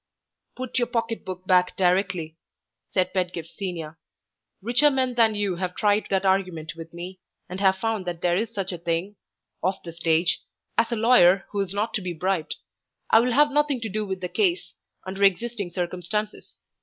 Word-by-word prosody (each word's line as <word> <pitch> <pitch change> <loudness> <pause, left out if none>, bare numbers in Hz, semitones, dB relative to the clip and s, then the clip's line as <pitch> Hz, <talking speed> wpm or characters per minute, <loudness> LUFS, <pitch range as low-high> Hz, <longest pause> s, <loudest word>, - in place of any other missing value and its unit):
"Put 255 0 -3
your 240 - +1
pocket 230 -1 -2
book 185 0 -7
back 180 -1 +3
directly," 180 -3 +1 0.6
said 185 -1 +1
Pedgift 180 -3 -2
Senior. 165 -6 -6 0.6
"Richer 240 +8 +4
men 260 -2 0
than 225 -3 +3
you 200 -4 -1
have 180 0 -3
tried 210 0 +2
that 195 0 +1
argument 185 -5 0
with 165 0 -9
me, 180 +2 -8 0.3
and 185 +1 -6
have 190 -1 +3
found 220 -2 -2
that 175 -1 -4
there 175 -1 +3
is 220 +4 0
such 195 -4 -4
a 175 - -6
thing 170 +4 -2 0.5
(off 185 +2 -1
the 170 - -7
stage) 165 0 +1 0.3
as 230 +1 +2
a - - +1
lawyer 215 -5 +5
who 205 - -2
is 195 -2 -1
not 205 +3 -1
to 215 - -1
be 180 -2 -4
bribed. 175 -1 -1 0.6
I 225 - +8
will 245 +1 +1
have 295 +3 +5
nothing 295 -2 +2
to 225 - -3
do 215 +2 -2
with 190 -2 -4
the 180 - -2
case, 360 - 0 0.3
under 190 +1 -6
existing 200 +1 +1
circumstances. 180 +4 -4
190 Hz, 185 wpm, -25 LUFS, 180-225 Hz, 0.6 s, I